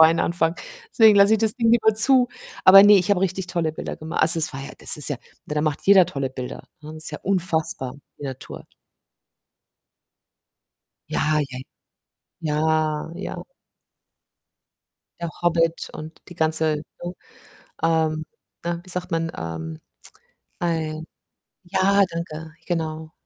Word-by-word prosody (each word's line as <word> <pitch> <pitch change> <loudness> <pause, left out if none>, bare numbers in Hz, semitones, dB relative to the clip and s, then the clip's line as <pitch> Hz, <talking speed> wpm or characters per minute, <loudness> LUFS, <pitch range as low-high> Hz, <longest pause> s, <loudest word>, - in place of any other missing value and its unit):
anfangen. 165 +1 +3 0.4
Deswegen 220 -3 +6
lasse 200 +2 +6
ich 220 - +1
das 220 -1 +2
Ding 230 -3 +2
lieber 220 -2 +4
zu. 250 +3 +5 0.4
Aber 195 +1 +10
ne, 205 0 +8
ich 190 +1 +1
habe 195 -3 +3
richtig 190 -1 -1
tolle 170 -3 -1
Bilder - - -6
gema 160 +2 -7
also, 165 +1 +3
es 155 - 0
war 135 - -6
ja 135 - -7
das - - +1
ist 150 -3 +4
ja, 145 - -2 0.3
ne, 150 - -4
da 150 - +1
macht 150 -1 -1
jeder 195 -3 +7
tolle 135 -6 -3
Bilder, 130 -1 -7 0.2
ne? 155 +1 -9
Ist 155 +1 -6
ja 150 - -6
unfassbar 165 -8 -1 0.2
die - - -8
Natur. 130 -2 -8 2.5
Ja, 155 0 +1
ja, 125 - -7 0.8
ja, 155 -1 0
ja. 185 - -6 1.8
Der 170 - -3
Hobbit 165 -1 +1
und 155 +1 -9
die 175 - -11
ganze, 160 -2 0 0.2
ne, 175 - -4 0.7
ähm, 160 -1 +1 0.4
ne, 170 0 -3
wie 185 - -14
sagt 180 +1 -5
man? 165 0 -1
Ähm, 80 -1 -6 0.8
ei, 160 -2 -2 0.6
ja, 190 +2 +2
danke, 160 -2 -6
genau. 160 -2 -3
165 Hz, 140 wpm, -23 LUFS, 155-185 Hz, 2.5 s, Aber